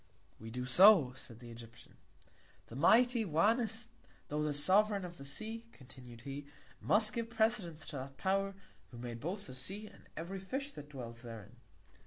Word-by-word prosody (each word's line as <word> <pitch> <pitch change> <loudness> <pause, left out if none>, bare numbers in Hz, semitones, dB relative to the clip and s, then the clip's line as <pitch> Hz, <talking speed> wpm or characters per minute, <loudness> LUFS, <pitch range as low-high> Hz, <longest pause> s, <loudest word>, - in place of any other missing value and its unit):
We 110 - -8
do 125 +2 -4
so, 170 -1 +7
said 120 -3 -10
the 120 -1 -10
Egyptian. 115 0 -13 0.8
The 115 - -9
mighty 235 - +5
Oannés, 220 +6 +1 0.4
tho' 150 +1 -1
the 150 0 +1
Sovereign 195 +7 +3
of 175 -1 -9
the 140 - -9
Sea, 220 +11 -5
continued 125 -3 -13
he, 140 +2 -6 0.3
must 215 +1 +3
give 230 0 -2
Precedence 215 -8 0
to 150 - -5
that 135 +1 -7
Power, 195 +1 0 0.3
who 120 - -11
made 120 -1 -6
both 190 - -4
the 130 - -9
Sea, 190 +12 -3
and - - -16
every 180 +4 -4
Fish 270 +9 -4
that 145 - -10
dwells 115 -4 -7
therein. 115 -2 -10
160 Hz, 170 wpm, -35 LUFS, 125-215 Hz, 0.8 s, so